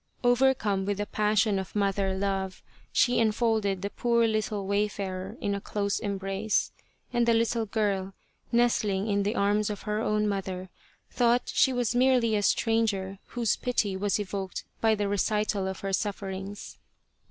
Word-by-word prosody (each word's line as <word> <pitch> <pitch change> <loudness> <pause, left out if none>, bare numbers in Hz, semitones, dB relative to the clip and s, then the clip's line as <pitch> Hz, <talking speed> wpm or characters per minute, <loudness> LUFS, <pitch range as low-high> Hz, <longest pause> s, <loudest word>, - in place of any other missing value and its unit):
Overcome 245 -6 +2
with 205 -1 0
the 205 - -2
passion 210 -1 +1
of 190 - -7
mother 195 -1 0
love, 195 -1 -2 0.3
she 245 - +3
enfolded 220 -3 +1
the 200 - -2
poor 235 -1 +2
little 215 -2 -1
wayfarer 200 0 -2
in 200 - -1
a 200 - -3
close 200 -1 -1
embrace, 195 +1 -1 0.4
and 240 -1 +2
the 230 - +5
little 230 0 +1
girl, 200 -3 -1 0.4
nestling 215 -5 +2
in 200 -1 +1
the 205 +3 -1
arms 205 +1 +2
of 205 -2 -5
her 210 0 -1
own 210 -1 +1
mother, 190 -2 -3 0.4
thought 245 0 +2
she 265 - +4
was 245 -3 0
merely 245 -3 +3
a 205 - +1
stranger 205 -3 +1 0.2
whose 235 -3 +2
pity 220 -6 -1
was 200 +1 0
evoked 195 -2 -4 0.2
by 220 -1 +4
the 205 -1 -1
recital 205 -1 0
of 190 - -5
her 195 0 -3
sufferings. 195 0 -4
205 Hz, 155 wpm, -28 LUFS, 195-225 Hz, 0.4 s, the